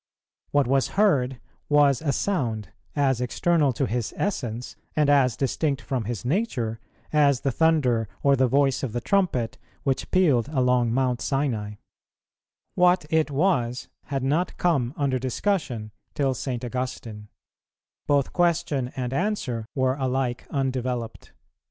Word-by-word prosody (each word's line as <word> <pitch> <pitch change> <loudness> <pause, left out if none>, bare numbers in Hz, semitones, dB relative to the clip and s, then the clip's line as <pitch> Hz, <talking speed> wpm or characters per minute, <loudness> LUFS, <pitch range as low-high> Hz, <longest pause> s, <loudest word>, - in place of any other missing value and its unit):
What 145 -1 +3
was 135 +2 +2
heard 135 - +3 0.3
was 145 -3 +4
a 150 -3 0
sound, 120 - -1 0.3
as 135 -4 +2
external 150 +3 +2
to 135 - 0
His 120 -2 -3
Essence, 125 - -3 0.2
and 150 -2 +3
as 130 -5 +3
distinct 140 +1 0
from 130 -5 -3
His 115 -3 -4
Nature, 125 - -1 0.3
as 140 -4 +4
the 135 - 0
thunder 130 -7 +2 0.2
or 140 -1 +5
the 130 -1 +3
voice 135 +1 +2
of 125 -6 -3
the 120 - -1
trumpet, 155 - 0 0.2
which 135 -2 -1
pealed 145 -11 +3
along 125 -4 +2
Mount 125 0 0
Sinai; 120 -8 -1 1.0
what 180 -2 +3
it 160 -1 +2
was 135 -6 0 0.2
had 135 -2 -3
not 155 +7 0
come 140 -7 +1
under 135 -4 0
discussion 130 - -2 0.2
till 135 -2 +1
St. 125 0 -4
Augustine; 120 -4 -5 0.8
both 140 -2 +2
question 170 -7 +1
and 125 -1 -3
answer 135 - -1
were 130 -1 +2
alike 130 -2 -1
undeveloped. 130 -4 -3
135 Hz, 135 wpm, -25 LUFS, 120-150 Hz, 1.0 s, or